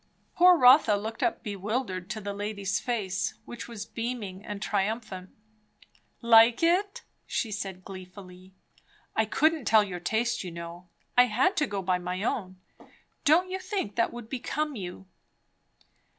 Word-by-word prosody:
Poor 360 0 +6
Rotha 250 -5 +7
looked 220 +2 -5
up - - 0
bewildered 205 -2 -3
to 215 - -4
the 200 -1 -5
lady's 205 -1 -2
face, 200 -6 -2
which 240 - -8
was 220 -3 -7
beaming 225 -6 -5
and 205 -1 -6
triumphant. 200 -2 -2 0.9
"Like 230 +3 +6
it?" 375 +4 +1 0.2
she 225 - -2
said 195 -2 -5
gleefully. 185 0 -11 0.6
"I 220 - +3
couldn't 310 +4 +1
tell 215 -1 +5
your 185 -3 -5
taste, 230 +6 -1
you 180 - -5
know. 170 +1 -9 0.3
I 245 - +7
had 255 - +2
to 300 - +2
go 200 -2 -3
by 180 0 +1
my 180 +2 -4
own 185 -5 -3 0.7
Don't 345 +5 +4
you 380 - -2
think 370 - -3
that 230 - +1
would 240 -2 -8
become 285 +4 -3
you?" 190 -2 -7
215 Hz, 150 wpm, -28 LUFS, 190-245 Hz, 0.9 s, Rotha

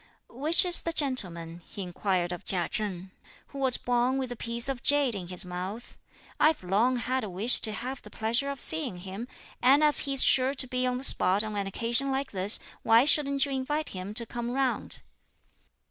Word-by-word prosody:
"Which 305 +9 +2
is 355 -1 +4
the 335 - -3
gentleman," 175 - 0
he 200 +2 -8
inquired 180 0 -2
of 180 - -7
Chia 180 -3 0
Chen, 190 -4 -4 0.4
"who 280 - -9
was 260 -2 +2
born 245 +2 0
with 260 -2 -4
a - - -5
piece 235 +2 -3
of 270 -3 -4
jade 285 -3 +3
in 185 -4 -4
his 180 +1 0
mouth? 185 +6 -7 0.4
I've 310 -8 +2
long 215 +8 +1
had 255 +2 -2
a 210 - -5
wish 200 +7 +3
to 215 - +3
have 250 +5 -6
the 210 - -13
pleasure 235 +6 -1
of 280 -1 -6
seeing 295 - +1
him, 195 +6 -7 0.3
and 275 +4 +4
as 300 -1 +6
he's 275 -1 +3
sure 265 +1 +3
to 265 - +1
be 255 0 -2
on 250 0 -1
the 255 - -6
spot 195 -5 +3
on 215 -1 -6
an 200 -1 -2
occasion 235 +6 -1
like 270 +1 -3
this, 195 +2 +3 0.2
why 230 +3 +4
shouldn't 280 -2 +2
you 280 - -6
invite 295 +4 -3
him 190 +2 -7
to 235 - +1
come 240 +1 -5
round?" 260 0 -2
240 Hz, 205 wpm, -27 LUFS, 200-270 Hz, 0.4 s, as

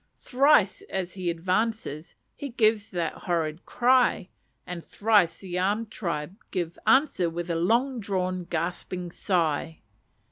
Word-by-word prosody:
Thrice, 260 -7 +3
as 185 -2 -3
he 185 -2 -2
advances, 180 -2 -2 0.2
he 285 - -6
gives 220 -3 +2
that 170 -3 -2 0.2
horrid 165 -1 -1
cry; 250 -6 +3 0.4
and 180 -2 -6
thrice 205 -5 +2
the 180 -2 -3
armed 210 +4 0
tribe 170 -2 -4
give 175 -2 -3
answer 265 - +4
with 170 +1 -4
a - - 0
long 235 +9 +1
drawn 185 -3 -2
gasping 175 +1 -3
sigh. 165 -4 -1
185 Hz, 130 wpm, -27 LUFS, 170-220 Hz, 0.4 s, answer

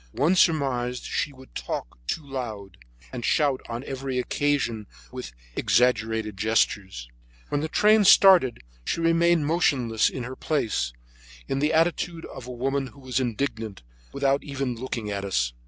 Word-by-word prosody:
One 150 +8 +2
surmised 130 -8 +1
that - - -7
she 145 - -1
would 130 -1 -16
talk - - -5
too 155 - -3
loud, 110 -9 -6 0.4
and 120 - -5
shout 140 -1 +2
on 120 +2 -4
every 135 -1 -4
occasion 125 -5 0 0.2
with - - -7 0.2
exaggerated 110 -4 +1
gestures. 100 - 0 0.4
When 145 - 0
the 155 - -1
train 210 +5 +4
started 180 - +6 0.2
she 165 - -2
remained 165 -1 +3
motionless 130 -9 +2
in 130 - -5
her 130 +2 -6
place, 110 - -1 0.6
in 135 - -1
the 150 +2 +2
attitude 165 +1 0
of 125 -2 -9
a - - -6
woman 135 +2 -1
who 140 - -15
was 130 -1 -2
indignant, 115 - -3 0.3
without 140 0 +1
even 135 -3 -3
looking 115 -3 -4
at 100 -1 -3
us. 60 -11 0
130 Hz, 155 wpm, -25 LUFS, 110-145 Hz, 0.6 s, started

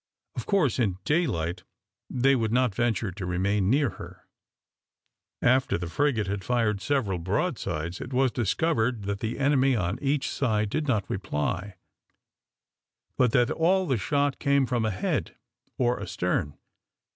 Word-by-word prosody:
Of - - -5
course, 165 - +2
in 100 -7 +1
daylight 95 - 0 0.5
they 135 +2 +3
would 110 -3 0
not 125 -2 +2
venture 115 -2 0
to 95 +2 -7
remain 95 +2 0
near 140 +1 +3
her. - - -11 1.2
After 130 +1 +3
the 85 -1 -5
frigate 140 -6 +1
had 100 0 -3
fired 110 -3 0
several 115 -10 0
broadsides, 95 - -2
it 125 - -7
was 130 0 +2
discovered 120 - 0
that 100 0 -3
the 110 +2 -3
enemy 135 -1 +3
on 100 +2 -1
each 140 -1 0
side 110 -6 0
did 155 -1 -1
not 110 -7 +1
reply, 95 +1 -3 1.4
but 125 -3 +3
that 125 +1 +3
all 185 +4 +2
the 130 -7 +1
shot 140 +6 0
came 140 -1 +3
from 120 -3 0
ahead 95 -4 -2 0.4
or 125 -3 +1
astern. 90 -5 -2
115 Hz, 145 wpm, -27 LUFS, 95-135 Hz, 1.4 s, they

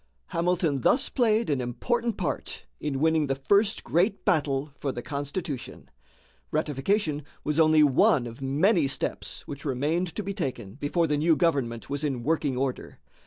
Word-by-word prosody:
Hamilton 170 -5 0
thus 265 - +3
played 230 -3 +2
an 135 -3 0
important 230 - -1
part 175 -6 -3
in 145 -3 -2
winning 160 -1 +2
the 135 - 0
first 200 - +2
great 180 - +1
battle 145 -3 +1
for 140 - -1
the 120 -1 -6
Constitution. 145 - -5 0.6
Ratification 150 +2 0 0.2
was 150 +1 0
only 155 -1 +6
one 135 -2 +4
of 120 +2 -9
many 150 +5 +3
steps 135 - -3
which 140 -1 -7
remained 155 +6 -1
to 210 - -3
be 200 +1 -3
taken 125 - -4
before 145 +6 0
the 150 -2 0
new 160 +1 +4
government 135 -9 0
was 145 +1 -3
in 135 -5 -2
working 145 -3 0
order. 130 -1 -3
150 Hz, 160 wpm, -27 LUFS, 135-175 Hz, 0.6 s, only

